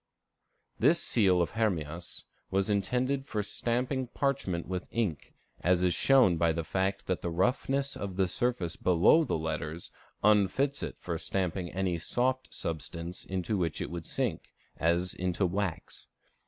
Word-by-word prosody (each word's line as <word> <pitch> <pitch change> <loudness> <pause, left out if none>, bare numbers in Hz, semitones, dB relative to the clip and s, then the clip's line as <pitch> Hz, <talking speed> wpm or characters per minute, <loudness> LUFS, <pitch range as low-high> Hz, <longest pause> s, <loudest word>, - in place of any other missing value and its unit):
_ - - -35
This - - +5
seal 95 -6 +3
of 85 - -4
Hermias 85 -7 -2 0.2
was 95 +2 +1
intended 125 +7 0
for 110 -6 -2
stamping 125 +5 -1
parchment 130 - -1
with 90 0 -4
ink, 105 -11 -2 0.3
as 90 0 +3
is 90 -1 +3
shown 130 -11 +5
by 85 0 +3
the 85 +1 -2
fact 95 +4 -1
that 90 - -1
the 85 - -2
roughness 135 +9 0
of 95 -2 -5
the 95 -1 +2
surface 120 -4 -1
below 90 - +5
the 135 - -1
letters 80 +1 -4 0.3
unfits 105 +7 +3
it - - -5
for 85 -2 -4
stamping 90 -2 -2
any 90 -2 -1
soft 130 +8 0
substance 85 +2 -5
into 95 +2 -2
which 85 -3 -1
it - - -4
would 85 -2 -5
sink, - - -2 0.2
as 85 +2 +1
into 90 +1 0
wax. 95 -1 -3
95 Hz, 155 wpm, -30 LUFS, 85-120 Hz, 0.3 s, This